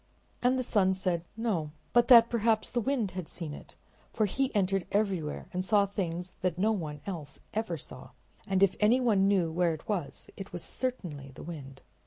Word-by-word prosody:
And 250 Hz, +1 st, +3 dB
the 255 Hz, -, 0 dB
sun 190 Hz, -5 st, +2 dB
said 180 Hz, -3 st, -1 dB
no, 200 Hz, -10 st, -1 dB, 0.2 s
but 240 Hz, -1 st, +5 dB
that 235 Hz, -3 st, +9 dB
perhaps 225 Hz, -2 st, +1 dB
the 240 Hz, -, 0 dB
wind 235 Hz, -5 st, 0 dB
had 180 Hz, -3 st, -5 dB
seen 160 Hz, -4 st, -6 dB
it, -, -, -10 dB, 0.4 s
for 215 Hz, -, +1 dB
he 270 Hz, +6 st, 0 dB
entered 195 Hz, -1 st, +1 dB
everywhere 195 Hz, -7 st, 0 dB
and 180 Hz, +1 st, -1 dB
saw 205 Hz, +1 st, +4 dB
things 180 Hz, -2 st, -3 dB
that 180 Hz, -2 st, 0 dB
no 210 Hz, +4 st, +3 dB
one 155 Hz, -8 st, -3 dB
else 160 Hz, -7 st, -6 dB
ever 215 Hz, -6 st, -1 dB
saw, -, -, -10 dB, 0.4 s
and 195 Hz, 0 st, +3 dB
if 195 Hz, -, +4 dB
anyone 215 Hz, -3 st, +4 dB
knew 185 Hz, -5 st, +2 dB
where 170 Hz, 0 st, +1 dB
it 155 Hz, -, -15 dB
was 190 Hz, -8 st, -3 dB
it 195 Hz, 0 st, -8 dB
was 175 Hz, -, -6 dB
certainly 165 Hz, -, -4 dB
the -, -, -9 dB
wind. 140 Hz, -5 st, -9 dB
190 Hz, 190 wpm, -30 LUFS, 170-220 Hz, 0.4 s, that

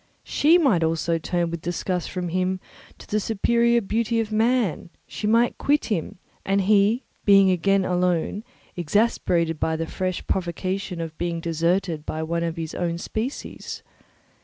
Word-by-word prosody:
She 320 Hz, +4 st, +4 dB
also 170 Hz, -, +2 dB
might 165 Hz, -, 0 dB
turn 170 Hz, 0 st, -1 dB
with 170 Hz, -1 st, -4 dB
disgust 175 Hz, +1 st, -2 dB
from 180 Hz, -2 st, -3 dB
him 185 Hz, +2 st, 0 dB, 0.4 s
to -, -, -14 dB
the 210 Hz, -, 0 dB
superior 235 Hz, +3 st, +2 dB
beauty 230 Hz, +2 st, 0 dB
of 220 Hz, -1 st, -2 dB
man; 225 Hz, -5 st, +1 dB, 0.2 s
she 210 Hz, -, -4 dB
might 230 Hz, +2 st, +3 dB
quit 295 Hz, +1 st, +2 dB
him, 175 Hz, -4 st, -2 dB, 0.3 s
and 195 Hz, +1 st, +1 dB
he 210 Hz, +5 st, +3 dB, 0.2 s
be 195 Hz, -2 st, +6 dB
again 195 Hz, +2 st, +2 dB
alone, 180 Hz, +2 st, 0 dB, 0.3 s
exasperated 170 Hz, -3 st, +1 dB
by 160 Hz, -, 0 dB
the 165 Hz, +1 st, -2 dB
fresh 185 Hz, +2 st, -3 dB
provocation 185 Hz, 0 st, -2 dB
of 160 Hz, -1 st, -6 dB
being 170 Hz, -1 st, -1 dB
deserted 165 Hz, 0 st, 0 dB
by 160 Hz, +1 st, -4 dB
one 170 Hz, +1 st, -1 dB
of 165 Hz, 0 st, -2 dB
his 160 Hz, -1 st, -4 dB
own 170 Hz, -1 st, -2 dB
species. 220 Hz, +9 st, -5 dB
185 Hz, 155 wpm, -24 LUFS, 170-215 Hz, 0.4 s, be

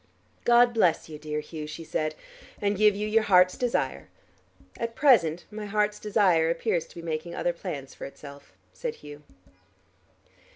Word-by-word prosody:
"God 240 Hz, 0 st, +5 dB
bless 180 Hz, -8 st, +2 dB
you, 150 Hz, -1 st, -8 dB
dear 150 Hz, 0 st, -3 dB
Hugh," 150 Hz, 0 st, -7 dB
she 155 Hz, +2 st, -7 dB
said, 155 Hz, -1 st, -2 dB, 0.4 s
"and 205 Hz, 0 st, 0 dB
give 210 Hz, 0 st, +4 dB
you 210 Hz, +1 st, -2 dB
your 220 Hz, +1 st, +3 dB
heart's 185 Hz, -3 st, +5 dB
desire." 245 Hz, -1 st, -1 dB, 0.7 s
"At 230 Hz, 0 st, -4 dB
present 180 Hz, -, +4 dB
my 210 Hz, 0 st, -6 dB
heart's 210 Hz, 0 st, 0 dB
desire 190 Hz, -6 st, +3 dB
appears 165 Hz, 0 st, -1 dB
to -, -, -18 dB
be 170 Hz, -, -8 dB
making 165 Hz, +1 st, -4 dB
other 175 Hz, -, 0 dB
plans 140 Hz, -5 st, -7 dB
for -, -, -8 dB
itself," 140 Hz, -3 st, -12 dB, 0.2 s
said 95 Hz, +11 st, -4 dB
Hugh. 145 Hz, 0 st, -10 dB
175 Hz, 160 wpm, -27 LUFS, 155-210 Hz, 0.7 s, God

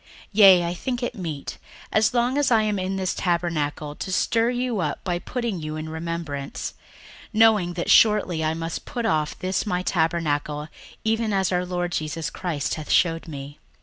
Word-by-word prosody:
61:001:013 -, -, -28 dB, 0.2 s
Yea, 195 Hz, -4 st, +7 dB
I 170 Hz, -, -1 dB
think 245 Hz, +7 st, -3 dB
it 245 Hz, -, -2 dB
meet, 165 Hz, -9 st, -5 dB, 0.3 s
as 215 Hz, +1 st, +3 dB
long 245 Hz, +1 st, +1 dB
as 290 Hz, -, +2 dB
I 225 Hz, -3 st, +4 dB
am 210 Hz, -2 st, 0 dB
in 185 Hz, +1 st, -2 dB
this 190 Hz, -1 st, -1 dB
tabernacle, 160 Hz, -4 st, -1 dB
to 190 Hz, -, -6 dB
stir 230 Hz, +5 st, +2 dB
you 245 Hz, -3 st, -1 dB
up 150 Hz, -5 st, -2 dB
by 175 Hz, -2 st, -1 dB
putting 235 Hz, -3 st, -3 dB
you 155 Hz, 0 st, -5 dB
in 155 Hz, 0 st, -5 dB
remembrance; 160 Hz, -4 st, -4 dB, 0.5 s
61:001:014 -, -, -23 dB
Knowing 215 Hz, -5 st, +4 dB
that 175 Hz, 0 st, -1 dB
shortly 205 Hz, -7 st, +4 dB
I 155 Hz, +1 st, 0 dB
must 165 Hz, 0 st, -4 dB
put 240 Hz, -2 st, -4 dB
off 155 Hz, -5 st, 0 dB
this 185 Hz, +3 st, -2 dB
my 180 Hz, -2 st, 0 dB
tabernacle, 155 Hz, -3 st, 0 dB, 0.3 s
even 225 Hz, 0 st, +1 dB
as 190 Hz, -2 st, +1 dB
our 180 Hz, 0 st, 0 dB
Lord 175 Hz, -1 st, -2 dB
Jesus 155 Hz, -1 st, -3 dB
Christ 165 Hz, -6 st, -2 dB
hath 155 Hz, -2 st, -6 dB
shewed 165 Hz, -2 st, +2 dB
me. 145 Hz, -1 st, -8 dB
175 Hz, 185 wpm, -24 LUFS, 160-210 Hz, 0.5 s, Yea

